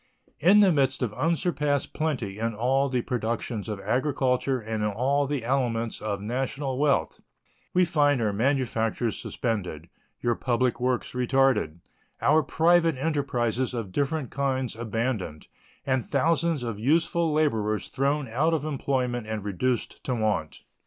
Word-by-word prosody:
In 195 +7 +6
the 195 -3 +6
midst 135 -3 +1
of 110 -4 -2
unsurpassed 150 0 0
plenty 125 -11 -2
in 115 0 -1
all 135 +5 +1
the 125 -2 0
productions 115 -2 -3
of 105 -2 -3
agriculture 130 +3 0
and 110 -1 -3
in 105 - +1
all 135 +7 +1
the 140 -5 -2
elements 120 -3 -1
of 100 -2 -2
national 130 +4 -2
wealth, 145 -1 +1 0.5
we 180 0 +4
find 145 -5 +2
our 110 -3 0
manufactures 115 -1 0
suspended, 90 -9 -3 0.4
our 120 - +3
public 125 +1 0
works 125 0 -1
retarded, 125 - +1 0.4
our 155 +2 +4
private 165 +2 +3
enterprises 130 -4 -1
of 110 -5 -4
different 140 - -1
kinds 130 -3 -1
abandoned, 110 -7 -3 0.4
and 130 -2 +1
thousands 160 0 +1
of 115 -4 -4
useful 165 +5 +2
laborers 110 -9 0
thrown 140 +1 0
out 150 +9 +1
of 150 -1 -3
employment 130 -5 -1
and 110 -2 -3
reduced 115 +5 -2
to 130 - -1
want. 105 -9 -1
130 Hz, 140 wpm, -26 LUFS, 115-145 Hz, 0.5 s, In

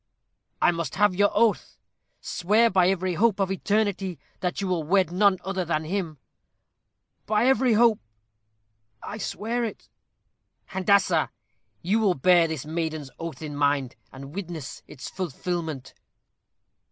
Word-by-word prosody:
"I - - +6
must 170 -2 -4
have 205 -2 +3
your 205 +2 +3
oath. 230 -3 +1 0.4
Swear 215 +6 +2
by 185 -1 +4
every 185 -1 0
hope 210 +3 +2
of 195 -1 +1
eternity 200 -2 -1 0.2
that 180 -1 -2
you 195 - -2
will 180 -3 0
wed 185 +2 +2
none 195 +1 +3
other 190 -1 -1
than 160 -2 -1
him." 165 -2 -3 1.1
"By 215 +2 +2
every 260 -2 +3
hope, 225 0 +4 1.0
I 215 - -6
swear 235 +4 -2
it." 225 - -6 0.8
"Handassah, 190 -4 +2 0.5
you 200 +6 +2
will 200 -5 +2
bear 170 +4 +4
this 160 -4 -5
maiden's 155 -3 -3
oath 165 -1 -6
in 150 -1 -6
mind, 140 -3 0 0.2
and 135 +2 -10
witness 170 -7 -6
its 130 - -9
fulfilment." 170 -4 -4
185 Hz, 135 wpm, -25 LUFS, 160-205 Hz, 1.1 s, I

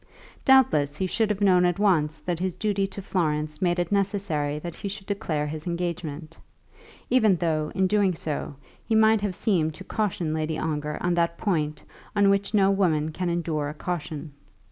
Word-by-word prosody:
Doubtless 155 - +4
he 190 - 0
should 215 +4 0
have 210 -1 -2
known 185 -3 +5
at 175 -1 +2
once 160 -7 +2
that 175 -2 -2
his 185 -1 -2
duty 200 0 0
to 195 0 -8
Florence 150 -5 -1
made 175 -1 +2
it 175 0 -1
necessary 190 -8 0
that 170 +2 -6
he 200 - -6
should 200 0 -6
declare 160 -7 -2
his 155 +2 -6
engagement, 170 -2 -4 0.8
even 220 -6 +5
though, 155 -3 -1
in 190 0 +2
doing 195 -2 +2
so, 150 -2 -4 0.3
he 225 - 0
might 220 -1 +5
have 200 -3 -2
seemed 160 -8 +1
to 190 - -9
caution 185 -7 -2
Lady 155 0 -2
Ongar 150 -1 -2
on 175 0 +2
that 170 0 +1
point 155 -7 -1 0.3
on 200 -1 +5
which 200 0 0
no 200 -3 +4
woman 160 -6 +1
can 180 +3 -2
endure 160 -4 -1
a 150 - -7
caution. 155 -2 -4
175 Hz, 185 wpm, -25 LUFS, 155-200 Hz, 0.8 s, known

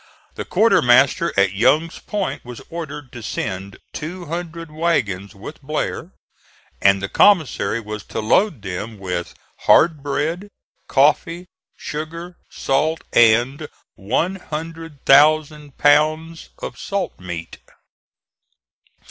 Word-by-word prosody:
The - - -6
quartermaster 140 - +4
at 100 -1 +3
Young's 155 +11 +2
Point 205 -3 -4
was 125 -1 -9
ordered 150 -5 -7
to 120 - -9
send 100 -3 -5 0.2
two 175 +4 -6
hundred 165 0 -6
wagons 115 - -1
with 110 +11 -10
Blair, 155 +3 -3 0.7
and 100 0 +4
the - - -1
commissary 150 - +3
was 105 -1 -7
to - - -5
load 125 - +1
them 105 +4 -5
with 90 -3 -4 0.3
hard 160 -3 +5
bread, 155 +7 -2 0.4
coffee, 165 +5 +2 0.3
sugar, 165 +4 -6
salt 155 +4 -1
and 120 +6 +4 0.3
one 170 - -1
hundred 165 -3 -8
thousand 150 0 +4
pounds 155 +3 +2
of - - -7
salt 200 -1 -3
meat. 85 -2 -7
150 Hz, 110 wpm, -20 LUFS, 110-165 Hz, 0.7 s, hard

